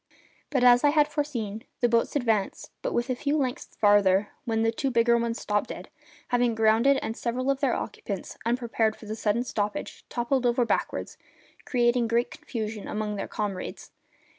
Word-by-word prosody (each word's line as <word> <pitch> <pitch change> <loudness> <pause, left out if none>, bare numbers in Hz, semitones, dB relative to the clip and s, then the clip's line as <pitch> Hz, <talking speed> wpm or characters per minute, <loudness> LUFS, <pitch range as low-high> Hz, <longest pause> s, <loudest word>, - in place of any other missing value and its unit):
But, 265 -4 +1
as 245 +1 +7
I 290 - +6
had 295 0 +4
foreseen, 240 -9 -3 0.2
the 240 - +3
boats 230 +3 +1
advanced 225 -7 0
but - - -2 0.2
a 255 - -1
few 285 +4 0
lengths 255 -4 -3
farther 205 -1 +4 0.2
when 225 -2 0
the 225 - +3
two 270 +4 -1
bigger 235 -1 +3
ones 235 0 -1
stopped 210 0 -1
dead, - - -7 0.4
having 245 -2 +2
grounded, 225 +5 +4
and 225 - -3
several 255 +3 -1
of 275 - -2
their 275 -4 +1
occupants, 200 -2 -5
unprepared 230 -2 0
for - - -13
the 215 +1 -4
sudden 220 +2 0
stoppage, 210 -4 -3
toppled 245 +1 0
over 240 0 +2
backward, - - -1 0.5
causing 240 -2 +2
great 235 +1 +1
confusion 215 -3 -5
among 210 0 -2
their 200 - -4
comrades. 200 -3 -5
235 Hz, 170 wpm, -27 LUFS, 215-250 Hz, 0.5 s, as